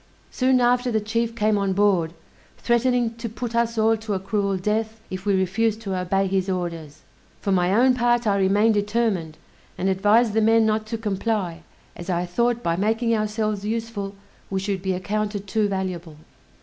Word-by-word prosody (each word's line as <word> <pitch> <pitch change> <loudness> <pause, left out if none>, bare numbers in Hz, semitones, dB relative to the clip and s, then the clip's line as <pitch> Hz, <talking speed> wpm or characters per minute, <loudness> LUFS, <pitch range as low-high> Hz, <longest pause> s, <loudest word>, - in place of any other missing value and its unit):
Soon 255 0 +2
after 245 +1 +2
the 220 - +2
chief 230 +2 -2
came 215 -2 +2
on 195 -1 0
board, 185 -5 +2 0.4
threatening 240 -1 +1
to 230 0 -5
put 235 +2 -5
us 235 0 0
all 220 +1 +4
to 215 -2 -3
a - - -1
cruel 200 0 -1
death 220 +3 -2
if 185 +2 -6
we 200 - +3
refused 210 +4 0
to 195 -4 -3
obey 185 +2 0
his 190 0 0
orders. 165 -5 -4 0.4
For 200 - -2
my 180 -1 +2
own 250 +5 +4
part 240 -1 +1
I 200 -2 +2
remained 205 +4 +3
determined, 205 -6 -1 0.4
and 190 - 0
advised 210 +4 +3
the 220 - +2
men 225 +1 +4
not 215 0 0
to 230 +1 -3
comply, 205 -4 -2 0.3
as 175 +2 -8
I 175 0 0
thought 235 +6 0
by 170 0 +1
making 225 +4 +1
ourselves 215 -1 -1
useful 215 -2 -3 0.3
we 195 - -1
should 195 -1 -2
be 190 0 -1
accounted 205 +2 -3
too 210 +1 +1
valuable. 180 -5 -4
210 Hz, 180 wpm, -23 LUFS, 190-225 Hz, 0.4 s, all